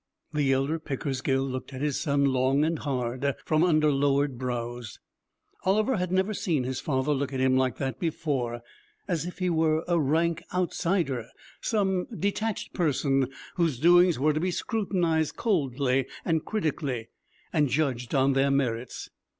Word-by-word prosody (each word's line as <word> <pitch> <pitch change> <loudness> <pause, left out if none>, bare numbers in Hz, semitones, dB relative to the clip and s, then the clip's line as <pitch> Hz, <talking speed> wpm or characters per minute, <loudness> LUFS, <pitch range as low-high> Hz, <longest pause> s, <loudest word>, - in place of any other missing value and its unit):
The 145 -3 +2
elder 135 +5 +1
Pickersgill 135 -2 -1
looked 130 +1 -5
at 130 - -6
his 150 -2 0
son 140 -3 +1
long 135 +2 +2
and 165 -1 -1
hard 130 -1 -1
from 155 +1 +2
under 155 -4 +4
lowered 140 0 +2
brows. 120 -2 -4 0.7
Oliver 215 +6 +2
had 180 -1 -2
never 190 +3 +1
seen 160 -9 0
his 130 +1 -3
father 135 0 0
look 140 -1 -2
at 135 - -3
him 130 0 +3
like 130 -1 +1
that 135 -2 -3
before: 135 -8 -2 0.5
as 170 -2 -1
if 180 - -7
he 180 -1 0
were 160 -1 +2
a 175 -1 +2
rank 160 +3 +1
outsider, 170 - 0 0.3
some 190 -5 +1
detached 210 +2 -2
person 135 -5 +1 0.3
whose 165 -7 +1
doings 175 +4 +5
were 150 +4 +2
to 155 - 0
be 180 +3 0
scrutinized 175 - 0
coldly 135 - +1 0.2
and 160 -2 0
critically, 145 - -2 0.4
and 150 -4 +3
judged 130 -4 -1
on 135 0 +3
their 135 +1 +3
merits. 125 -3 -1
145 Hz, 155 wpm, -27 LUFS, 130-170 Hz, 0.7 s, doings